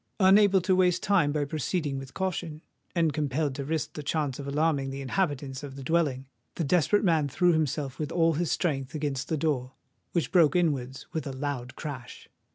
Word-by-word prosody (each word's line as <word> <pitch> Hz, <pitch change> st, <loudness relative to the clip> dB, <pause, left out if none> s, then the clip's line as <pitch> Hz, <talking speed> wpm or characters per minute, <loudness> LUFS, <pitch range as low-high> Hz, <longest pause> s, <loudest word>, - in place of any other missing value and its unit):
Unable 195 Hz, 0 st, +6 dB
to 185 Hz, +1 st, +2 dB
waste 180 Hz, -1 st, +2 dB
time 185 Hz, -8 st, +3 dB
by 145 Hz, -1 st, 0 dB
proceeding 150 Hz, -1 st, -2 dB
with 135 Hz, -1 st, -10 dB
caution, 175 Hz, -4 st, -3 dB, 0.3 s
and 165 Hz, -3 st, +2 dB
compelled 145 Hz, -1 st, -1 dB
to 140 Hz, +1 st, -4 dB
risk 155 Hz, +1 st, -2 dB
the 150 Hz, -, -5 dB
chance 145 Hz, -2 st, -1 dB
of 140 Hz, -, -6 dB
alarming 145 Hz, -1 st, +1 dB
the 135 Hz, +1 st, -5 dB
inhabitants 140 Hz, -3 st, -2 dB
of 140 Hz, -2 st, -8 dB
the 135 Hz, -, -8 dB
dwelling, 140 Hz, -4 st, 0 dB, 0.3 s
the 170 Hz, -, -1 dB
desperate 180 Hz, +7 st, +3 dB
man 160 Hz, -6 st, +2 dB
threw 175 Hz, +7 st, +3 dB
himself 150 Hz, -3 st, -1 dB
with 155 Hz, 0 st, -3 dB
all 165 Hz, -1 st, +3 dB
his 165 Hz, +1 st, -1 dB
strength 140 Hz, -3 st, -1 dB
against 145 Hz, -3 st, -2 dB
the 160 Hz, -, -1 dB
door, 135 Hz, -4 st, -1 dB, 0.4 s
which 170 Hz, -, 0 dB
broke 170 Hz, -5 st, +5 dB
inwards 135 Hz, -7 st, 0 dB
with 160 Hz, -2 st, -3 dB
a -, -, -3 dB
loud 130 Hz, -2 st, -4 dB
crash. 135 Hz, -5 st, -7 dB
150 Hz, 190 wpm, -28 LUFS, 135-170 Hz, 0.4 s, Unable